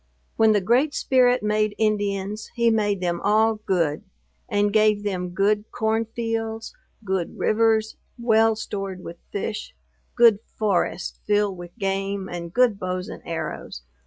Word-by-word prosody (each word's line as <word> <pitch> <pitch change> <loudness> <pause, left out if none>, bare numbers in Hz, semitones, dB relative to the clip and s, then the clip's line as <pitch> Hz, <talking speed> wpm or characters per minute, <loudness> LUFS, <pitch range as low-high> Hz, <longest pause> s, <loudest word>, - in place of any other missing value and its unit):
When 220 -1 +5
the 205 - +2
Great 250 +9 +2
Spirit 250 -3 +3
made 210 0 +1
Indians, 205 -1 -1
he 235 -1 +3
made 205 -3 +1
them 175 -1 -1
all 220 +2 +4
good, 165 -5 +1 0.5
and 205 -2 +1
gave 215 -1 +3
them 185 -3 -2
good 205 +3 +1
corn 220 0 0
fields; 225 -1 -4 0.3
good 190 -3 -2
rivers, 220 0 +2 0.2
well 225 -2 +3
stored 195 -3 -5
with 170 - -8
fish; 210 +1 -4 0.4
good 230 -4 +6 0.2
forests, 200 -3 -1
filled 205 -2 +2
with 175 +4 -11
game 195 -1 -2
and 170 -1 -6
good 240 -2 +3
bows 185 +2 -3
and - - -8
arrows. 160 - -5
210 Hz, 140 wpm, -24 LUFS, 195-225 Hz, 0.5 s, good